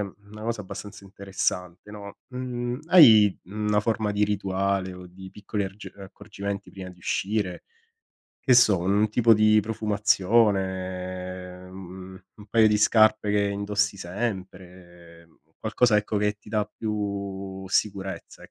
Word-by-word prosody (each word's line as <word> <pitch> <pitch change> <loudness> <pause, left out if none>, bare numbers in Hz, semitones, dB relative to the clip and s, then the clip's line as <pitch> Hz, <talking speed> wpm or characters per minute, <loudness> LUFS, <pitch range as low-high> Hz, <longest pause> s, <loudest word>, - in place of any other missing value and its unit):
una 105 +2 -9
cosa 115 -1 -3
abbastanza 100 0 -9
interessante, 95 -1 -4
no, 100 -1 -10
mhmm, 125 0 -4
hai, 110 - +7
mhmm, 105 +3 -5
una 105 0 +3
forma 110 -1 -1
di 105 0 +2
rituale, 100 -1 -1
o 90 0 -11
di 95 +1 -12
piccoli 105 0 -4
argi 100 +2 -9
uhm, 100 - -12
accorgimenti 100 0 -7
prima 95 -1 -9
di 90 - -17
uscire? 95 +1 -2 0.8
Che 130 - +3
so, 110 -6 +5
un 100 +4 +1
tipo 115 +1 +4
di 110 0 +4
profumazione, 95 -4 -1
ehm, 95 0 -10 0.2
u - - -22
un 105 - -15
paio 110 +1 +4
di 105 -1 +2
scarpe 110 -1 +4
che 105 0 +2
indossi 100 0 -1
sempre, 90 -4 -7 0.3
qualcosa, 110 +1 +2
ecco, 105 0 -1
che 105 0 +1
ti 105 - -18
dà 105 -1 0
più 100 -3 -4
sicurezza 95 -1 -2
e - - -21
100 Hz, 145 wpm, -25 LUFS, 95-105 Hz, 0.8 s, hai